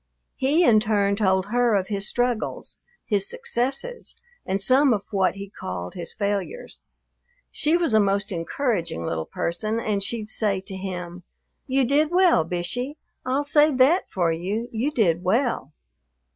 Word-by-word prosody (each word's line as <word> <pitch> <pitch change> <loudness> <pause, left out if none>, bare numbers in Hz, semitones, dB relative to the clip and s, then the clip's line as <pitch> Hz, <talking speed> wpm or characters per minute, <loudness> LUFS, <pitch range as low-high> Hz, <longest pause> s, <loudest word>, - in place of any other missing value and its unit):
He 290 +7 +2
in 220 -6 +6
turn 205 -2 +1
told 190 -2 +2
her 240 -2 +3
of 190 0 -1
his 200 0 -3
struggles, 245 -2 -2 0.3
his 200 -2 +1
successes, 475 - -2 0.3
and 195 - 0
some 260 +5 +4
of 200 - -5
what 195 -2 +1
he 200 0 -8
called 90 - -6
his 170 -2 -2
failures. 205 - -3 0.7
She 315 +3 +2
was 335 -9 0
a 220 - +6
most 200 +1 +1
encouraging 170 - -2
little 80 -1 -3
person, 215 +7 -2
and 210 -3 -1
she'd 215 +1 -3
say 210 -3 -1
to 190 0 -9
him, 180 -2 -6 0.5
"You 265 0 +2
did 295 +4 +2
well, 355 - +4
Bishey. 210 - -3 0.3
I'll 265 +3 +1
say 295 +1 +4
that 265 +8 +3
for 175 -3 0
you: 195 +8 -3
you 235 +5 -1
did 175 - +2
well!" 215 - 0
215 Hz, 155 wpm, -24 LUFS, 190-260 Hz, 0.7 s, in